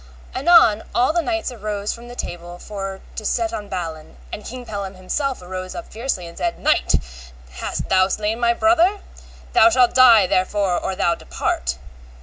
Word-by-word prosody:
Anon 270 -8 +5
all 250 +5 +3
the 345 - +2
knights 335 -4 -2
arose 210 -3 -3
from 235 +1 -11
the 245 - -10
table 175 -4 -6
for 195 0 -6
to 220 - -5
set 340 +10 -1
on 205 -9 -5
Balin, 165 - -6 0.2
and - - -6
King 250 +1 -8
Pellam 200 -3 -5
himself 255 +6 -3
arose 185 +1 -6
up 345 - -8
fiercely, 225 -6 -3
and 170 - -10
said, 345 -1 -2
Knight, 305 +1 +2 0.6
hast - - -4
thou 185 0 +4
slain 215 +3 -2
my 235 0 +2
brother? 345 - +3 0.5
thou - - +7
shalt 255 -7 +3
die 235 -6 +7
therefore 190 0 +1
or 190 - -3
thou 170 - +2
depart. 65 - -3
210 Hz, 170 wpm, -21 LUFS, 185-260 Hz, 0.6 s, thou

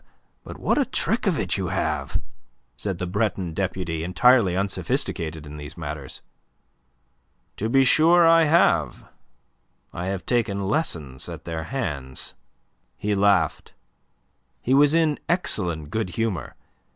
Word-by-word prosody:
But - - -9
what - - +1
a - - +2
trick - - 0
of - - +2
it - - -1
you - - -2
have," 75 -3 -2 0.6
said 95 -4 -4
the 90 - -3
Breton 95 -2 -1
deputy, 85 -3 -3
entirely 95 +1 +4
unsophisticated 80 -5 -2
in 75 0 -9
these 75 +1 -9
matters. 75 -3 -7 1.3
"To 110 - -2
be 135 +3 +5
sure 165 +6 +5
I 165 0 +6
have. 150 - +2 0.9
I 90 +2 -4
have 95 -3 -3
taken 105 -5 0
lessons 80 - -2
at 80 -1 -9
their 80 -1 -4
hands." 75 - -3 0.6
He 105 0 -1
laughed. 100 -5 +1 0.8
He 130 - 0
was 145 +3 +5
in 160 -3 +2
excellent 85 - 0
good 110 -2 -1
humour. 110 - -3
95 Hz, 130 wpm, -24 LUFS, 80-120 Hz, 1.3 s, I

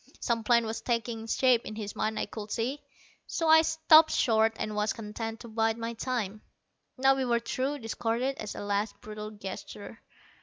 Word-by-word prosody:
Some 230 -2 -1
plan 235 0 +4
was 225 +1 -4
taking 230 -2 -2
shape 250 0 +3
in 215 - -7
his 210 -2 -6
mind, 215 0 -1
I - - 0
could 215 -1 -8
see, 250 +7 -2 0.5
so 330 - -1
I 320 0 +8
stopped 320 0 +6
short, 225 -1 +3
and 215 0 -3
was 210 +1 +1
content 225 0 -6
to - - -9
bide 225 0 0
my 230 0 -4
time. 225 -4 -3 0.6
Now 270 +1 +5
we 270 0 -1
were 240 -2 +2
through, 260 +4 -2
discarded, 240 +2 -2
as 215 - -5
a - - -6
last 205 +1 -2
brutal 215 0 -7
gesture. 205 -3 -8
225 Hz, 185 wpm, -29 LUFS, 215-255 Hz, 0.6 s, I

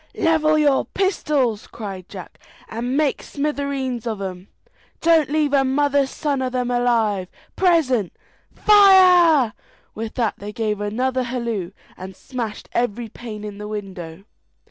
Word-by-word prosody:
"Level 310 -1 +2
your 290 -3 +3
pistols!" 290 - -1
cried 195 -4 -8
Jack, 185 -3 -10 0.3
"and 245 +4 -3
make 300 -3 +1
smithereens 280 -4 -3
of 220 -3 -3
'em. 185 -1 -6 0.5
Don't 325 -4 +3
leave 300 -1 +1
a 275 -1 +4
mother's 280 +1 +1
son 285 -2 -2
of 255 0 -3
'em 250 -1 -1
alive; 230 -6 +1 0.3
present, 280 - +2 0.4
fire!" 365 - +6 0.4
With 220 0 -6
that 235 -4 -1
they 205 +1 -7
gave 210 -2 -2
another 255 +5 -1
halloo, 235 -7 -3 0.3
and 190 +1 -9
smashed 230 -1 -6
every 235 -1 -2
pane 215 -2 -9
in 205 -1 -7
the 210 - -6
window. 190 -5 -7
245 Hz, 135 wpm, -21 LUFS, 210-285 Hz, 0.5 s, fire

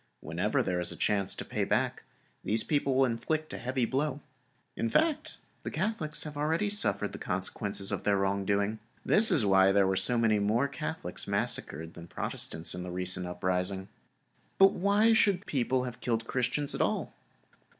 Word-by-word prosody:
Whenever - - -1
there 90 -1 -1
is 90 0 +2
a - - -5
chance 100 -2 +1
to - - -6
pay - - -2
back, - - 0 0.4
these 110 +1 +2
people 145 -3 0
will 135 0 +4
inflict 155 +7 -2
a - - -5
heavy 130 0 -1
blow. 140 +3 -1 0.6
In 115 - -1
fact, 310 - 0 0.2
these - - -6
Catholics 170 -9 -1
have 150 -1 -7
already 160 +8 0
suffered 205 - +2
the - - -8
consequences 95 +1 -3
of - - -2
their 100 -1 +2
wrong 100 0 0
doing; 100 +2 0 0.3
this 220 +1 +5
is 120 - +3
why 95 -1 +5
there 100 0 +4
were 95 0 +1
so 120 +5 +2
many 110 -2 +2
more 110 +7 +1
Catholics 155 - -5
massacred 80 +3 -1
than 85 0 -11
Protestants 80 -1 -2
in 90 - -5
the 90 - -6
recent 90 0 0
uprising. 95 +2 -1 0.7
But 195 0 +7
why 205 +4 +3
should 200 -4 +3
the - - -21
people 130 -4 0
have 125 -1 -7
killed 115 -2 0
the - - -18
Christians 125 +4 0
at - - -2
all? - - -1
115 Hz, 185 wpm, -29 LUFS, 95-150 Hz, 0.7 s, But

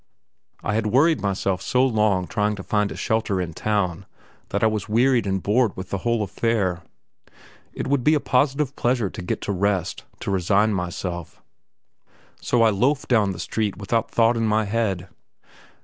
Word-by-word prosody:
I 100 - -1
had 110 0 0
worried 140 +3 +3
myself 95 -1 -1
so 125 +1 +2
long 105 -6 +2
trying 105 +2 -1
to 95 - -8
find 105 -2 0
a - - -6
shelter 110 -3 0
in 85 -3 -3
town 100 -2 -1 0.4
that 100 - -1
I - - +6
was 110 -2 -1
wearied 120 0 +3
and 95 -1 -1
bored 110 +1 +2
with 95 -1 -7
the 100 - -1
whole 115 +1 0
affair. 100 -3 -1 0.9
It - - -4
would 140 -2 +1
be 155 +4 +4
a - - +2
positive 140 +1 +1
pleasure 120 -5 0
to - - -7
get 90 - -3
to - - -3
rest, 100 -1 -1 0.2
to - - -3
resign 100 +3 +2
myself; 90 -2 -5 1.0
so 120 -2 +2
I 110 - +5
loaf 135 +9 +1
down 110 -5 +3
the 95 - -4
street 105 +1 -2
without 110 +3 -1
thought 115 +1 +3
in 115 -1 0
my 110 0 +2
head. 100 -4 -1
105 Hz, 180 wpm, -23 LUFS, 95-115 Hz, 1.0 s, I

